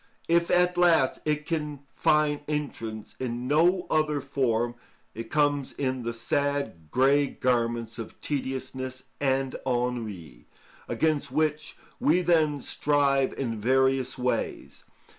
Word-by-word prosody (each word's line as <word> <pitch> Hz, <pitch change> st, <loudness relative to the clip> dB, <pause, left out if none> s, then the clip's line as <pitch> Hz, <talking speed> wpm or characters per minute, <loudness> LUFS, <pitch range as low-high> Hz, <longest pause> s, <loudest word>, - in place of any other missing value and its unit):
If 170 Hz, 0 st, +3 dB
at 180 Hz, 0 st, +3 dB
last 165 Hz, -7 st, +4 dB
it 150 Hz, 0 st, 0 dB
can 150 Hz, -4 st, -3 dB
find 150 Hz, -1 st, +2 dB
entrance 115 Hz, -8 st, -4 dB
in 125 Hz, -1 st, -3 dB
no 175 Hz, +6 st, +3 dB
other 155 Hz, -2 st, +2 dB
form, 120 Hz, -4 st, 0 dB, 0.4 s
it 115 Hz, 0 st, -7 dB
comes 145 Hz, -2 st, +1 dB
in 130 Hz, -2 st, -2 dB
the 115 Hz, 0 st, -2 dB
sad, 115 Hz, -, -2 dB
grey 140 Hz, -, +3 dB
garments 120 Hz, -3 st, -1 dB
of 115 Hz, -, -8 dB
tediousness 130 Hz, -2 st, -4 dB, 0.2 s
and 135 Hz, -1 st, 0 dB
ennui, 115 Hz, -, -3 dB, 0.4 s
against 150 Hz, -4 st, 0 dB
which 155 Hz, +1 st, -1 dB, 0.2 s
we 170 Hz, +5 st, +3 dB
then 155 Hz, -5 st, +2 dB
strive 140 Hz, -2 st, +1 dB
in 115 Hz, -5 st, -3 dB
various 130 Hz, +2 st, +2 dB
ways. 125 Hz, 0 st, -3 dB
135 Hz, 120 wpm, -27 LUFS, 125-150 Hz, 0.4 s, last